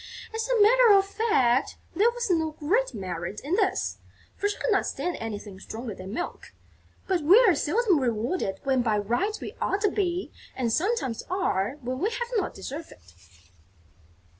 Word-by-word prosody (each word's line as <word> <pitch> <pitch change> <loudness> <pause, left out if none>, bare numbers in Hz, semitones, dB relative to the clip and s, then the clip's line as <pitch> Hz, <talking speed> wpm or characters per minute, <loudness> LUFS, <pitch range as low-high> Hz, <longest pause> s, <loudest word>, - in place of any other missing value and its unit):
As 450 +2 -2
a - - +2
matter 470 +2 +6
of 390 -1 +5
fact, 285 - +1 0.2
there 440 +4 +4
was 480 0 -3
no 320 -2 +1
great 355 - 0
merit 185 0 -5
in 295 +5 -3
this, 400 -2 0 0.4
for 410 - 0
she 415 - -4
could - - -1
not 395 - +2
stand 355 - -2
anything 205 -3 -6
stronger 225 +2 -6
than 190 +1 -9
milk; 345 +11 -5 0.5
but 370 -3 +1
we 340 +8 +7
are 380 - +6
seldom 360 +4 +2
rewarded 230 - -1
when 265 -2 +2
by 220 -3 +1
rights 240 - -1
we - - -6
ought 395 - 0
to 410 -2 +2
be 365 -3 -1 0.2
and 235 -4 -1
sometimes 355 - 0
are 285 - 0
when 255 +1 -4
we 400 - +1
have 475 0 -4
not 425 - -1
deserved 310 +5 -7
it. 90 0 -18
325 Hz, 175 wpm, -26 LUFS, -, 0.5 s, we